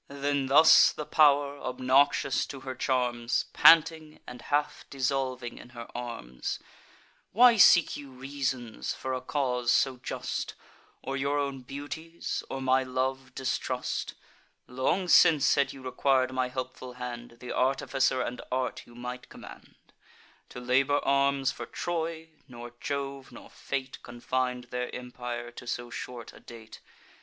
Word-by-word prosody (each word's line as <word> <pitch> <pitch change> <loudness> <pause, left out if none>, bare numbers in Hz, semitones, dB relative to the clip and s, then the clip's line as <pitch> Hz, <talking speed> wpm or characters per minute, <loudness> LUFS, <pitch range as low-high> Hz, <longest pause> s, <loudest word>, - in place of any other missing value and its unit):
Then 140 -1 -1
thus 155 +4 +7
the 150 - -6
pow'r, 145 -2 +3
obnoxious 130 +2 +2
to 135 - -8
her 130 0 -5
charms, 125 -2 0
Panting, 160 -1 +5
and 125 -1 -10
half 145 +1 -1
dissolving 130 -2 -2
in - - -13
her 115 - -6
arms: 90 - -5 0.8
"Why 240 +1 +7
seek 175 -4 +6
you 145 -1 -9
reasons 130 -3 -4
for 130 0 -4
a 130 - -3
cause 125 -3 0
so 130 -2 +2
just, - - -4 0.5
Or 135 - -3
your 140 +1 0
own 140 -2 -2
beauties 145 +5 -6
or 135 0 -4
my 130 0 +3
love 130 0 -3
distrust? 130 -1 -3 0.5
Long 130 +9 -1
since, 155 -4 +6
had 140 -1 +1
you 135 - -12
requir'd 130 0 +1
my 130 0 0
helpful 130 0 -6
hand, 120 -1 -7
Th' 125 - -7
artificer 130 0 +1
and 125 - -5
art 130 0 -2
you 120 - -16
might 125 +1 -7
command, - - -13 0.7
To - - -8
labour 130 +3 +2
arms 140 -1 +2
for - - -8
Troy: 165 -1 -4 0.2
nor 120 -1 -10
Jove, 140 -1 -4
nor - - -13
fate, 130 -1 -5
Confin'd 125 +1 -3
their 125 0 -3
empire 120 -1 -6
to 120 0 -11
so 120 0 -4
short 120 -2 -7
a - - -14
date. 115 -2 -12
130 Hz, 140 wpm, -28 LUFS, 125-140 Hz, 0.8 s, thus